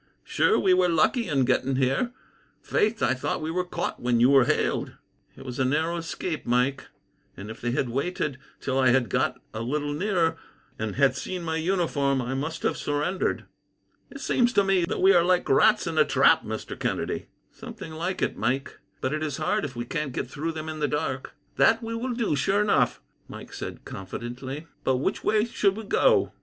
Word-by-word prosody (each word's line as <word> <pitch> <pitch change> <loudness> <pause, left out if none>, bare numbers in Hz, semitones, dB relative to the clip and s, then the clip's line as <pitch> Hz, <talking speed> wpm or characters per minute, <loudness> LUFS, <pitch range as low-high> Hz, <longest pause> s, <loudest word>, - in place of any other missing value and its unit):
Sure 440 - +2
we 190 -2 +4
were 180 -1 +3
lucky 180 - +2
in 135 -4 +2
getting 130 +1 +1
here. 135 - +1 0.5
Faith, 215 +2 0
I - - +3
thought 130 - -2
we 155 +1 -3
were 180 +2 0
caught 175 -1 -4
when 120 -1 +2
you 125 +3 +5
were 135 -3 +6
hailed." - - 0 0.4
"It - - -11
was 125 -1 -6
a - - +3
narrow 160 +6 0
escape, 165 0 -4
Mike; 125 +3 0 0.5
and 100 +3 -7
if 110 - -11
they 120 - -1
had 125 +1 0
waited 140 +1 -2 0.2
till 130 0 -1
I 130 - +4
had 120 -2 +3
got - - 0
a 110 - -4
little 145 +4 -2
nearer, 165 -1 +1 0.4
and 110 -2 -3
had 140 -1 +3
seen 180 -2 -4
my 160 -1 -1
uniform, 160 -6 +1
I 125 +1 -2
must 150 +5 -4
have - - 0
surrendered." 150 +6 -1 0.6
"It 275 - -10
seems 245 -1 +2
to 200 - +4
me 190 -3 +2
that - - -3
we 195 +1 +7
are 175 -2 +5
like 180 0 +2
rats 135 - +4
in - - -1
a - - +8
trap, - - +4
Mr. - - -6
Kennedy." - - -2 0.2
"Something 160 - -9
like 175 +4 -2
it, - - 0
Mike; 130 +4 -2 0.2
but 130 - -1
it 155 - -2
is 150 -3 -2
hard - - 0
if 135 -3 -5
we 120 0 -4
can't 150 0 -3
get - - -3
through 160 +3 -4
them, 155 0 -6
in 155 -1 -5
the 150 - +1
dark." 135 -3 -3 0.2
"That 225 +1 +4
we 225 0 -4
will 240 +2 -3
do, 230 -10 0
sure 195 +9 +2
enough," 210 - +2 0.3
Mike - - -10
said - - -7
confidently; 125 - -6 0.2
"but 130 - +2
which 145 +10 -2
way 215 0 +2
should 205 -4 +1
we 220 - -5
go?" 485 - +3
150 Hz, 205 wpm, -26 LUFS, 130-180 Hz, 0.6 s, a